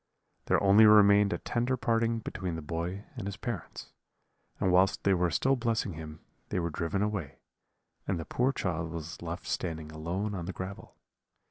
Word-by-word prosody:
"There - - +2
only 100 +2 +7
remained 105 -1 +6
a - - 0
tender 125 +2 -1
parting 115 -1 +1
between 90 -5 -4
the 80 - -6
boy 85 +6 -4
and 115 -6 -5
his 100 -1 -5
parents; 110 -5 -6 0.7
and 95 - +2
whilst 95 +2 +3
they 100 - +4
were 90 -1 +2
still 135 - +2
blessing 115 -5 -1
him 80 0 -9 0.3
they - - -1
were 85 -1 -2
driven 85 +5 -1
away, 100 -9 -3 0.7
and 95 -3 0
the 80 - -5
poor 125 +2 +1
child 85 - -2
was 85 +1 -7
left 85 +1 -5
standing 80 -3 -3
alone 90 +7 -3
on 90 -4 -4
the 95 - -4
gravel. 95 +2 -7
95 Hz, 175 wpm, -30 LUFS, 85-105 Hz, 0.7 s, only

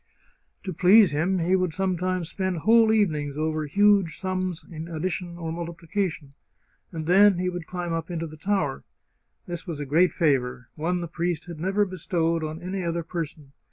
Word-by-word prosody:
To 185 - -4
please 190 +4 +6
him 170 +6 +1
he 180 +2 +2
would 185 -3 0
sometimes 185 -2 -1
spend 185 0 -2
whole 225 +5 +5
evenings 150 -10 +1
over 155 0 -1
huge 200 0 +3
sums 185 -2 -3
in 160 -1 -7
addition 170 +1 -4
or 165 -2 -4
multiplication. 170 -2 -4 0.6
And 160 -3 -5
then 195 +2 +6
he 180 +1 0
would 175 -2 -6
climb 175 -2 -4
up 165 +1 -3
into 165 -1 -3
the 155 -1 -9
tower. 160 -4 -1 0.6
This 175 +1 -6
was 165 -4 -4
a 145 - -3
great 165 +7 +3
favour 130 -7 0
— - - -51
one 175 +3 -1
the 170 - -4
priest 170 -1 -2
had 170 -3 -8
never 195 +4 +1
bestowed 170 -3 -1
on 155 +3 -5
any 185 +1 -3
other 170 0 -2
person. 160 -4 -6
175 Hz, 180 wpm, -25 LUFS, 160-185 Hz, 0.6 s, please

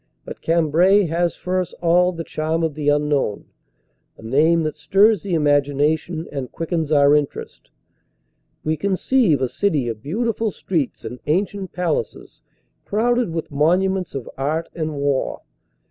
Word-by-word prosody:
But - - -9
Cambrai 170 +5 +3
has 170 +1 0
for 185 +1 -2
us 180 - -7
all 175 +1 +2
the 165 -2 -6
charm 160 +1 -2
of 160 -2 0
the 145 0 -1
unknown, 145 -7 0 0.7
a - - -15
name 155 +8 +3
that 155 -1 -2
stirs 195 +7 +3
the 190 -4 -2
imagination 150 +3 +1
and 135 -3 -5
quickens 165 -2 -3
our 145 -1 +5
interest. 140 - -3 0.9
We 155 0 -1
conceive 195 - +1
a - - +2
city 150 -4 0
of 110 -2 -4
beautiful 225 - -1
streets 165 -8 -3
and 125 - -6
ancient 190 +4 -1
palaces 170 -10 -3 0.4
crowded 240 +1 +1
with 165 -1 -4
monuments 180 +5 +1
of 135 - -5
art 155 +4 -1
and 155 -2 -3
war. 140 -1 -1
160 Hz, 145 wpm, -21 LUFS, 145-180 Hz, 0.9 s, our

